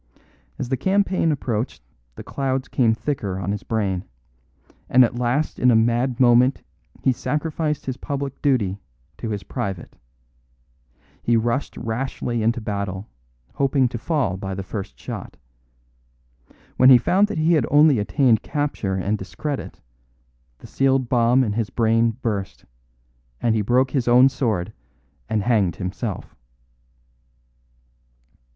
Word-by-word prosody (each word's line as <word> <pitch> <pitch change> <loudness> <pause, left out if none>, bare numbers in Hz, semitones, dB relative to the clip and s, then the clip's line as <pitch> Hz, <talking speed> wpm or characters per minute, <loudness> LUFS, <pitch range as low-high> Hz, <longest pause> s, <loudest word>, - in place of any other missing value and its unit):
As 120 - -4
the 130 - 0
campaign 190 0 +1
approached 120 - -3 0.3
the - - -9
clouds 135 -1 -2
came 115 -4 +2
thicker 110 -8 -3
on 95 +1 -3
his 105 0 -3
brain; 100 -5 -2 0.9
and 130 0 +6
at 120 +1 -4
last 125 +5 -1
in 125 - +4
a 120 - +5
mad 120 +3 +1
moment 125 +1 +4 0.4
he 130 - +4
sacrificed 150 +3 -2
his 130 -1 -4
public 140 -1 -5
duty 105 -9 +1 0.4
to 115 - -4
his 105 -2 -4
private. 95 -3 -5 1.3
He 120 -1 +2
rushed 120 +4 -1
rashly 120 0 -3
into 115 +3 +1
battle, 100 -2 -4 0.4
hoping 135 -1 +2
to 115 - -5
fall 140 - -1
by 95 0 -5
the 95 - -5
first 95 - -6
shot. - - -7 1.4
When 130 - +7
he 130 - +10
found 190 - +2
that - - -5
he 160 +2 +3
had 150 -7 +2
only 145 -3 +5
attained 110 +3 +2
capture 145 -10 -2
and 100 +3 -1
discredit, 140 +9 -5 0.8
the - - -15
sealed 135 -2 +1
bomb 120 +1 +3
in 105 -4 -1
his 110 -1 -2
brain 115 0 +1
burst, 100 -4 -3 0.7
and 115 - +1
he 110 - +1
broke 125 +5 +2
his 130 -3 -1
own 125 +2 +6
sword 110 -8 -2 0.6
and 110 -2 0
hanged 100 -7 +2
himself." 95 +4 -5
120 Hz, 135 wpm, -22 LUFS, 105-135 Hz, 1.4 s, he